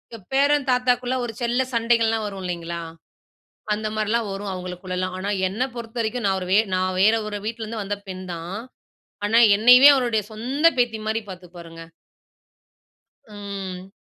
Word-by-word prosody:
எ, - - -8 0.2
பேரன் 285 +1 +3
தாத்தாக்குள்ள 250 0 +1
ஒரு 235 -2 -4
செல்ல 240 +2 +1
சண்டைகள்லாம் 230 -1 +2
வரும் 195 -2 -7
இல்லீங்களா? 170 -1 -4 0.9
அந்த 215 +1 -2
மாரில்லாம் 215 +1 0
வரும் 195 +1 -5
அவங்களுக்குள்லலாம். 185 0 -4
ஆனா 190 +2 -4 0.2
என்ன 205 +7 -3
பொறுத்தவரைக்கும் 235 0 -4
நான் 190 -1 +1
ஒரு 180 - -5
வே - - +5 0.2
நான் 185 0 0
வேற 215 +3 +5
ஒரு 210 -1 -4
வீட்ல 225 +1 -4
இருந்து 220 0 -5
வந்த 205 +1 -3
பெண் 185 0 -6
தான், 170 +3 -6 0.7
ஆனா 220 +2 +2 0.2
என்னையவே 250 +6 +8
அவருடைய 240 -5 0
சொந்த 255 +8 -2
பேத்தி 235 -3 +1
மாரி 220 +1 0
பார்த்துப்பாருங்க. 170 -2 -11 1.4
ம். 195 -3 -7
215 Hz, 145 wpm, -23 LUFS, 185-235 Hz, 1.4 s, என்னையவே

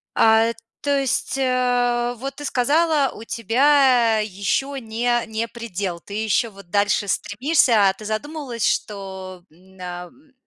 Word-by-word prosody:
А 225 +1 +4 0.3
то 285 -1 +1
есть, 270 0 -1
э, 245 -2 +1
вот 275 +3 -6
ты 290 - -8
сказала, 290 +2 +2
у 220 - -10
тебя 240 0 +3
ещё 210 +7 -2
не 240 0 -1
не 220 +1 -3
предел. 200 -7 -5
Ты 200 - -11
ещё 220 +2 +1
вот 195 -3 -15
дальше 205 +1 +1
стремишься. 230 - +2
А - - 0
ты 215 +2 -12
задумывалась, 245 +2 -3
что 190 -3 -4
н 185 +3 -20
ам, 180 - -9
230 Hz, 140 wpm, -22 LUFS, 200-265 Hz, 0.3 s, А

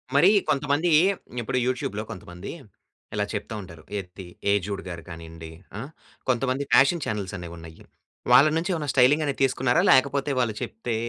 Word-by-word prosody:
మరి 155 +7 +7 0.2
కొంతమంది 145 +4 +1 0.5
ఇప్పుడు 120 +2 -2
యూట్యూబ్‌లో 110 -5 -2
కొంతమంది 90 -2 -8 0.6
ఇలా 105 0 0
చెప్తూ 105 +1 -4
ఉంటారు. 85 -4 -12
'ఎత్తి', 95 0 -8 0.3
'ఏజుడు 100 0 -1
గారు' 85 -2 -7
కానీయండి. 80 -1 -9 0.3
ఆ! - - -4 0.5
కొంతమంది 130 +2 +1
ఫ్యాషన్ 145 +4 +5
ఛానెల్స్ 105 -2 -3
అనేవి 85 -1 -8
ఉన్నాయి. 80 0 -12 0.5
వాళ్ళ 130 +4 +8
నుంచి 165 +3 -2
ఏమైనా 155 -4 -3
స్టైలింగ్ 140 +4 +5
అనేది 140 -2 -3
తీసుకున్నారా? 130 -1 +2
లేకపోతే 140 +1 +3
వాళ్ళు 120 -3 +1
చెప్తే 115 +1 -4
115 Hz, 145 wpm, -25 LUFS, 90-140 Hz, 0.6 s, వాళ్ళ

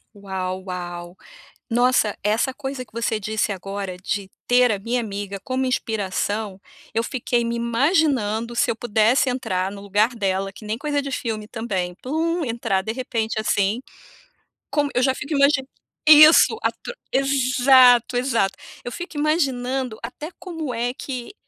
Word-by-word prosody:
Uau, 190 -2 -4
uau. 175 -1 -6 0.5
Nossa, 240 -3 +2
essa 220 +6 +1
coisa 265 -1 -5
que - - -30
você 230 -1 -1
disse 215 0 -1
agora 195 -1 -5
de 195 +1 -3 0.2
"ter 245 -1 +5
a 205 - -1
minha 235 +5 -1
amiga 200 -2 -5
como 260 0 -1
inspiração", 205 -3 -2 0.3
eu 225 - +1
fiquei 240 -2 -1
me 235 0 -2
imaginando 235 - +1
se - - +2
eu - - 0
pudesse 230 +3 +2
entrar 190 -7 -2
no 200 0 -9
lugar 205 +3 +2
dela, 195 -2 -1
que 215 - -13
nem 215 +1 -2
coisa 290 +1 -1
de 280 0 -5
filme 220 -4 -3
também, 200 -6 -3
plum, 325 +5 -1
entrar 230 -6 -1
de 220 - -3
repente, 230 -3 -2
assim, 210 +1 +1 0.9
como 290 -1 +1
eu 250 - +2
já 260 0 +2
fico 295 +3 -5
imagi 280 -1 +4 0.5
Isso, 310 +7 +8
a - - +1
tro - - -9 0.2
Exato, 255 -2 +4
exato. 235 -6 +1 0.3
Eu 245 - -5
fico 345 +4 -7
imaginando 265 -6 0
até 275 +6 -6
como 325 -7 -5
é 240 +1 -1
que 255 +2 -6
235 Hz, 155 wpm, -22 LUFS, 205-265 Hz, 0.9 s, Isso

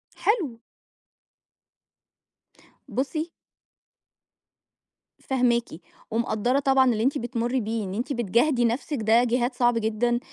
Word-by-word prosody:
حلو. 340 - 0 2.3
بُصّي 310 +5 -2 1.9
فاهماكِ 245 -3 +1 0.4
ومقدّرة 235 +3 +1
طبعًا 270 -2 +4
اللي 220 -1 -1
أنتِ 275 +4 +1
بتمري 240 0 -1
بيه 220 +1 -2
إن 190 -1 -5
أنتِ 240 +7 -2
بتجاهدي 240 +3 +2
نفسك، 255 +5 -1
ده 225 +3 +4
جهاد 245 +1 0
صعب 245 -1 +2
جدًا، 230 +2 0
240 Hz, 100 wpm, -25 LUFS, 230-265 Hz, 2.3 s, طبعًا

